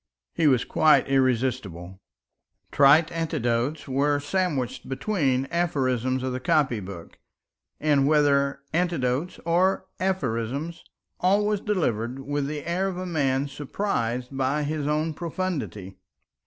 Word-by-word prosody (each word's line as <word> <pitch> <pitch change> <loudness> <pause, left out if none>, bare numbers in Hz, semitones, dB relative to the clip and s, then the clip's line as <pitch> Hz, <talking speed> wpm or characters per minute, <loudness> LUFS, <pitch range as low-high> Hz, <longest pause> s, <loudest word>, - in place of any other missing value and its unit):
He 160 - +2
was 130 -4 +3
quite 155 -1 +4
irresistible. 125 -9 0 0.7
Trite 145 +4 +5
anecdotes 150 -4 -1
were 145 +2 +1
sandwiched 145 -5 -2
between 135 -3 0
aphorisms 130 -7 0
of 130 -1 -2
the 130 - -3
copybook; 105 - -1 0.6
and 145 -3 +3
whether 140 -2 +3
anecdote 165 -2 0
or 185 +3 +2
aphorism, 150 -5 -1 0.5
all 200 +3 +3
was 210 -1 0
delivered 125 - -1
with 140 +1 -2
the 150 -1 -5
air 180 +3 0
of 185 -2 -4
a 185 - -4
man 140 -5 0
surprised 135 - -3
by 135 +3 0
his 150 0 -2
own 155 +2 0
profundity. 140 - -4
140 Hz, 115 wpm, -25 LUFS, 130-165 Hz, 0.7 s, Trite